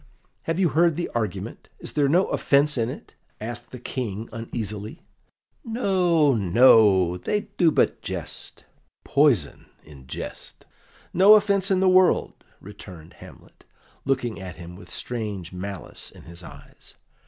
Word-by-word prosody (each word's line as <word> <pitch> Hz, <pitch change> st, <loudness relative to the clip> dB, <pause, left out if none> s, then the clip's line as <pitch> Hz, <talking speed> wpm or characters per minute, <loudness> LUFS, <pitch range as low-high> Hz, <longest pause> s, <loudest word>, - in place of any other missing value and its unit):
"Have 165 Hz, +2 st, 0 dB
you 180 Hz, -3 st, +3 dB
heard 165 Hz, 0 st, +3 dB
the 175 Hz, -, -3 dB
argument? 110 Hz, -6 st, -4 dB
Is -, -, -6 dB
there 145 Hz, -2 st, +2 dB
no 180 Hz, +6 st, +4 dB
offence 145 Hz, +2 st, +2 dB
in 115 Hz, -2 st, 0 dB
it?" -, -, -9 dB, 0.3 s
asked 120 Hz, +2 st, -7 dB
the 125 Hz, -, -9 dB
King 115 Hz, -3 st, -5 dB
uneasily. 110 Hz, -2 st, -6 dB, 0.6 s
"No, 180 Hz, -, +2 dB
no; 100 Hz, -3 st, +5 dB
they 210 Hz, -, -1 dB, 0.2 s
do 170 Hz, -, +6 dB
but -, -, +1 dB
jest -, -, -7 dB, 0.4 s
poison 130 Hz, -, +1 dB, 0.2 s
in 70 Hz, -4 st, -15 dB
jest; -, -, -8 dB, 0.5 s
no 195 Hz, +4 st, +8 dB
offence 200 Hz, -2 st, +2 dB
in 190 Hz, -1 st, +2 dB
the 190 Hz, -, +3 dB
world," 185 Hz, 0 st, +4 dB, 0.3 s
returned 90 Hz, -5 st, -12 dB
Hamlet, -, -, -15 dB, 0.4 s
looking 125 Hz, -6 st, -1 dB
at 90 Hz, -3 st, -8 dB
him 85 Hz, +1 st, -10 dB
with 90 Hz, -1 st, -14 dB
strange 105 Hz, -5 st, -5 dB
malice 95 Hz, +1 st, -7 dB
in -, -, -16 dB
his 85 Hz, +1 st, -10 dB
eyes. 70 Hz, -4 st, -14 dB
120 Hz, 140 wpm, -24 LUFS, -, 0.6 s, no